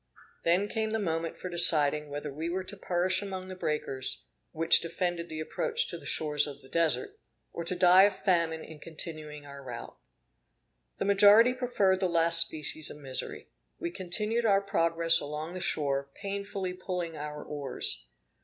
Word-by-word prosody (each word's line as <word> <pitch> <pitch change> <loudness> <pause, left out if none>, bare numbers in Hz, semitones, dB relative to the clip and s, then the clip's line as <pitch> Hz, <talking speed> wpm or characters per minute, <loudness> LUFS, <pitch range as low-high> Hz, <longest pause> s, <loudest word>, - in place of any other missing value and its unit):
Then 180 +5 +2
came 220 0 -2
the - - +1
moment 165 -5 -2
for - - -6
deciding 150 -4 +5
whether 145 0 -6
we 160 +4 -4
were 185 +2 -2
to 185 +2 -10
perish 185 0 0
among 190 -2 -6
the 185 - -6
breakers, 150 -6 -2 0.3
which 165 0 +6
defended 170 0 -3
the 155 - -6
approach 470 - -1
to - - -6
the - - -10
shores 150 -1 +1
of 140 - -9
the 130 - -16
Desert, 170 - -1 0.3
or 170 - -4
to 175 +2 -2
die 180 +1 +6
of 205 - 0
famine 165 -3 0
in 160 -1 -12
continuing 155 -2 -4
our 140 -1 -10
route. 120 -2 -8 1.0
The - - -2
majority 205 +4 +6
preferred 225 -7 +1
the 185 -2 0
last 165 0 +4
species 155 -1 -2
of - - -9
misery. 135 -3 -3 0.3
We 170 - -4
continued 210 +6 -2
our 195 -1 +4
progress 165 -4 +2
along 150 +3 -5
the 185 - -5
shore, 140 -5 -1
painfully 200 -2 -4
pulling 180 -2 -5
our 150 0 -6
oars. 140 - -1
170 Hz, 170 wpm, -29 LUFS, 150-190 Hz, 1.0 s, which